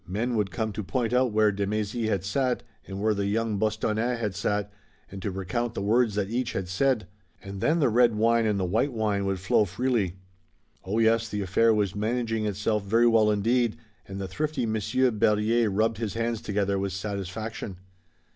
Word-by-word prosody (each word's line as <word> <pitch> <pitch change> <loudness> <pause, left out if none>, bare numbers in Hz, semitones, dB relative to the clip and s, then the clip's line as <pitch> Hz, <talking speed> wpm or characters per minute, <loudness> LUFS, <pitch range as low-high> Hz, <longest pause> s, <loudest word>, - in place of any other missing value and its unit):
Men 110 +7 -1
would 105 -4 0
come 110 +1 -2
to 105 +1 -5
point 120 +3 -1
out 125 -1 +3
where 105 0 +3
de 100 0 -2
Mézy 110 +2 -1
had 95 -4 0
sat, 125 +5 0 0.2
and 95 0 -6
where 110 +1 +2
the 100 -1 -1
young 110 0 0
Bostonnais 110 +3 0
had 105 -4 -2
sat, 105 +2 -1 0.4
and 95 0 -7
to 100 - -2
recount 95 +5 -3
the - - -2
words 110 +1 +2
that 105 -2 0
each 125 +1 -1
had 95 -1 -3
said. 110 +5 +1 0.4
And 95 0 -7
then 160 +2 +2
the 145 - +4
red 120 -1 +4
wine 115 +1 +3
and 105 -2 +1
the 95 - 0
white 110 +10 +1
wine 105 -3 0
would 95 -1 -1
flow 95 +3 +3
freely. 100 -1 -1 0.7
Oh, 100 +4 -2
yes, 115 0 +3
the 105 - -3
affair 100 +4 +3
was 105 -3 +1
managing 110 0 -1
itself 105 +1 -1
very 115 +4 +3
well 115 -2 +4
indeed, 115 +3 +1 0.3
and 95 0 -6
the 95 - -3
thrifty 145 +5 -2
Monsieur 110 +4 +1
Berryer 110 +1 +2
rubbed 110 +2 0
his 110 -3 -3
hands 115 -1 -1
together 100 -1 -1
with 95 -1 -2
satisfaction. 100 +1 -5
110 Hz, 195 wpm, -26 LUFS, 100-115 Hz, 0.7 s, the